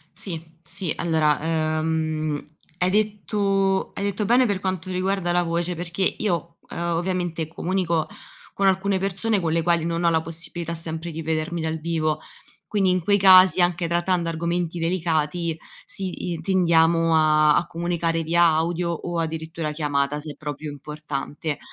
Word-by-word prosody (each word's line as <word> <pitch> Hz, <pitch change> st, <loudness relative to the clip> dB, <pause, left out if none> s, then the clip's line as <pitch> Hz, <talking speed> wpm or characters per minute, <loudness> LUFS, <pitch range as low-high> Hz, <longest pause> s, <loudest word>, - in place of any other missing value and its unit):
Sì, 180 Hz, -4 st, -4 dB, 0.2 s
sì, 180 Hz, -4 st, -3 dB
allora, 160 Hz, -3 st, +2 dB, 0.4 s
ehm, 155 Hz, -2 st, -1 dB, 0.4 s
hai 180 Hz, -, +2 dB
detto 200 Hz, -1 st, 0 dB
hai -, -, -4 dB
detto 200 Hz, +1 st, -1 dB
bene 245 Hz, +4 st, +4 dB
per 200 Hz, -2 st, -1 dB
quanto 185 Hz, -1 st, -3 dB
riguarda 185 Hz, -1 st, 0 dB
la 175 Hz, 0 st, +2 dB
voce, 170 Hz, +1 st, -1 dB
perché 175 Hz, +2 st, -2 dB
io, 170 Hz, -5 st, -2 dB
ehm, 170 Hz, 0 st, -2 dB
ovviamente 175 Hz, -3 st, -2 dB
comunico 170 Hz, -1 st, -1 dB, 0.5 s
con 195 Hz, -, 0 dB
alcune 190 Hz, +1 st, +2 dB
persone 195 Hz, +3 st, 0 dB
con 165 Hz, -3 st, -1 dB
le 165 Hz, +1 st, +2 dB
quali 170 Hz, -1 st, +2 dB
non 170 Hz, 0 st, -1 dB
ho 170 Hz, -, +5 dB
la 160 Hz, -1 st, +2 dB
possibilità 165 Hz, +1 st, -5 dB
sempre 165 Hz, 0 st, -3 dB
di 165 Hz, +1 st, -5 dB
vedermi 160 Hz, +2 st, -2 dB
dal 160 Hz, 0 st, -1 dB
vivo, 155 Hz, -1 st, -1 dB, 0.5 s
quindi 195 Hz, -3 st, +1 dB
in 180 Hz, 0 st, +2 dB
quei 200 Hz, +3 st, +3 dB
casi 185 Hz, -1 st, +7 dB
anche 175 Hz, -1 st, +2 dB
trattando 175 Hz, 0 st, +1 dB
argomenti 170 Hz, +1 st, -2 dB
delicati, 165 Hz, -1 st, 0 dB, 0.3 s
sì, 185 Hz, -2 st, -3 dB
i 165 Hz, -, -5 dB
tendiamo 165 Hz, -2 st, +3 dB
a 155 Hz, -1 st, +4 dB
a -, -, +2 dB
comunicare 165 Hz, -1 st, -1 dB
via 170 Hz, +2 st, +3 dB
audio 170 Hz, +2 st, +1 dB
o 170 Hz, 0 st, -3 dB
addirittura 160 Hz, -1 st, -3 dB
chiamata 145 Hz, -1 st, -1 dB
se 150 Hz, -1 st, -8 dB
proprio 150 Hz, 0 st, -6 dB
è -, -, -6 dB
importante, 150 Hz, +1 st, -5 dB
170 Hz, 155 wpm, -23 LUFS, 160-185 Hz, 0.5 s, casi